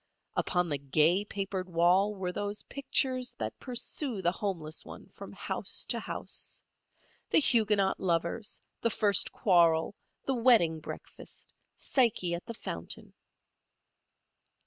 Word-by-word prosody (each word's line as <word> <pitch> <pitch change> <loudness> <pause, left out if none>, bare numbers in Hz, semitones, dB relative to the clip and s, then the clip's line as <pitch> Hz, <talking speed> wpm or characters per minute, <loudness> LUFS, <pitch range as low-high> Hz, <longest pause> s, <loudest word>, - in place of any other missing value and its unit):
Upon 180 -1 +1
the 145 -2 -1
gay 155 +7 +3
papered 195 -2 -4
wall 180 +5 +3
were 185 -2 -3
those 205 +2 -3
pictures 260 -2 -1
that 110 0 -5
pursue 250 -1 -3
the 175 - +3
homeless 170 -6 -4
one - - -11
from - - -10
house - - -3
to - - +1
house—The - - -6
Huguenot 210 -8 +3
Lovers, 175 +4 -1 0.2
The 230 - +2
First 205 -3 +3
Quarrel, 170 -5 +3 0.3
The 270 - +1
Wedding 230 -10 +4
Breakfast, - - -10 0.2
Psyche 225 -9 +1
at 170 - -5
the 230 - -6
Fountain. - - -7
195 Hz, 120 wpm, -30 LUFS, 170-230 Hz, 0.3 s, Wedding